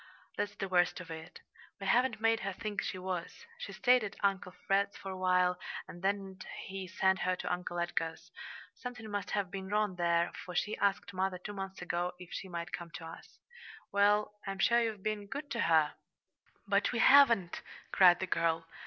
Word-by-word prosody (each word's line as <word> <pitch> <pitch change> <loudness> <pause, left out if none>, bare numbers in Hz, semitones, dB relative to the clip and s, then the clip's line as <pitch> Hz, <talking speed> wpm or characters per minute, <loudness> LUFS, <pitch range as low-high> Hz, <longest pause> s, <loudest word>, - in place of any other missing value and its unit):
"That's 205 0 -2
the 195 - -3
worst 180 -1 +2
of 180 -2 -9
it. 160 0 -9 0.4
We 195 - -6
haven't 235 +2 +3
made 225 0 +3
her 195 0 -3
think 210 -1 -3
she - - -3
was. 185 - -5
She - - -6
stayed 250 -2 +4
at 205 -1 -5
Uncle 195 -2 +1
Fred's 200 +1 +1
for 195 - -6
a - - -5
while, 180 -1 +2 0.3
and 175 - -10
then 195 -1 -1 0.3
he 190 -1 -6
sent 190 0 +2
her 185 0 +1
to 180 - -2
Uncle 180 0 -4
Edgar's. 165 -1 -2 0.4
Something 245 -3 -7
must 205 -1 -3
have 200 -3 -1
been 190 0 -5
wrong 210 -3 0
there, 170 -1 +2
for 180 - -8
she 210 +5 0
asked 200 -2 0
mother 185 0 -1
two 205 +3 -7
months 195 -2 -6
ago 175 0 -2
if 180 -1 -11
she 190 - -5
might 170 -1 -5
come 170 -1 -5
to 165 - -7
us." 165 - -11 0.5
"Well, 205 +1 +3
I'm 195 0 -3
sure 235 +4 +4
you've 220 -4 -2
been 215 -1 -2
good 285 +5 -6
to 235 - -2
her." 160 -6 +4 0.7
"But - - +2
we - - -2
haven't!" 230 -11 +6 0.3
cried 180 -2 +7
the 190 - -1
girl. 165 -2 0
190 Hz, 195 wpm, -32 LUFS, 180-205 Hz, 0.7 s, cried